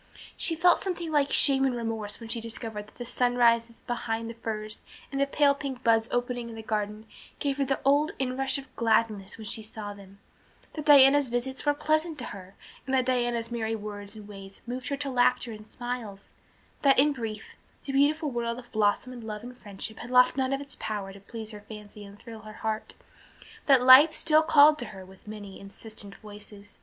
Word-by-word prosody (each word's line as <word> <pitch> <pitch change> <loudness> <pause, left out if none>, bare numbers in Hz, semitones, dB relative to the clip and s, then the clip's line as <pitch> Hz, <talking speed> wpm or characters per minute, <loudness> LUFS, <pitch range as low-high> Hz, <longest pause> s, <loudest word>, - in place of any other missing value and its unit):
She 330 - +1
felt 350 +2 +4
something 345 -4 -4
like 290 -2 +2
shame 270 -2 +6
and 265 -2 +1
remorse 225 -3 -4
when 230 - -9
she 230 0 -2
discovered 225 -2 -5
that - - -21
the 245 - -6
sunrises 235 -1 +2
behind 230 -2 -3
the - - -9
firs 215 -2 -6 0.3
and 275 0 -2
the 280 - +2
pale 285 0 +3
pink 275 -3 -6
buds 225 -1 +3
opening 245 -1 -2
in 230 - -9
the 220 - -8
garden 215 0 -3 0.3
gave 280 -1 -2
her 275 - +2
the 270 0 -1
old 290 +3 +3
inrush 265 +1 0
of 275 - -11
gladness 220 -3 0
when 220 - -9
she 220 - -2
saw 215 -1 -7
them 200 -1 -15 0.6
that 305 -2 -6
Diana's 280 -1 +7
visits 265 +4 -3
were 290 - +3
pleasant 310 +2 0
to 245 - -5
her 190 -1 -11 0.3
and 265 - +1
that 255 -1 +2
Diana's 240 -2 -1
merry 225 -1 -2
words 205 -1 -7
and 210 -1 -11
ways 195 -1 -11
moved 250 +2 -5
her 280 - -2
to 280 0 -3
laughter 250 -1 +2
and 215 0 -11
smiles 240 -5 -6 0.5
that, 275 -1 +4
in 290 +2 +5
brief, 220 -4 -6 0.3
the 275 - -5
beautiful 295 +2 +2
world 235 -1 -2
of 240 -1 -12
blossom 215 +4 0
and 240 -2 -9
love 215 -1 -6
and 250 +1 -9
friendship 210 -1 -8
had 240 - -8
lost 250 0 +5
none 265 -1 0
of 275 0 -1
its 285 0 -6
power 200 -3 -4
to 200 - -12
please 220 +2 -8
her 210 -1 -10
fancy 210 -1 -10
and 200 0 -13
thrill 225 0 -10
her 215 0 -11
heart, 220 0 -3 0.7
that 270 -3 +5
life 260 +5 +9
still 310 -1 +4
called 305 -1 +6
to 240 - -4
her 195 -4 -10
with 190 +2 -18
many 205 -2 -9
insistent 200 0 -8
voices. 205 -1 -12
235 Hz, 205 wpm, -27 LUFS, 215-270 Hz, 0.7 s, life